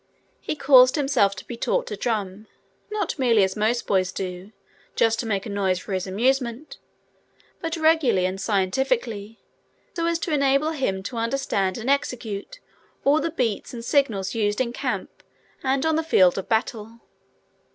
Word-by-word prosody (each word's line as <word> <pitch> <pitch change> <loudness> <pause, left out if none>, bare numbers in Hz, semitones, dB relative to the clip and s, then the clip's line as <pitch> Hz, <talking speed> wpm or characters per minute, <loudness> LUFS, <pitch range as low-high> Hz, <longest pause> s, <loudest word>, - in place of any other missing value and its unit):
He - - -4
caused 255 -3 +6
himself 270 -9 +2
to 190 - -10
be 240 - -7
taught - - 0
to - - -5
drum, 210 -2 -3 0.4
not 415 -7 -3
merely 230 -6 +4
as 190 0 0
most 225 +3 0
boys 185 -2 +1
do, 185 +1 -6 0.4
just 225 0 +2
to 230 - -3
make 200 -3 -1
a - - -5
noise 195 -2 0
for 195 - -6
his 185 0 -2
amusement, 245 +6 -1 0.8
but 330 0 -3
regularly 315 - +3
and 190 +1 -3
scientifically, 220 +2 -1 0.6
so 335 -1 -1
as 335 0 +1
to 335 -2 -3
enable 280 +2 +2
him 200 -11 -2
to 235 +4 -6
understand 230 -5 -1
and 235 +1 -6
execute 250 - -2 0.4
all 290 +3 +4
the 330 - -1
beats 245 -7 -2
and 230 0 -7
signals 215 -10 +1
used 210 -2 0
in 240 -2 -1
camp - - -4 0.4
and 265 +1 0
on 320 -1 +2
the 325 - 0
field 185 - +4
of 195 - -5
battle. 225 0 -2
230 Hz, 165 wpm, -24 LUFS, 200-275 Hz, 0.8 s, caused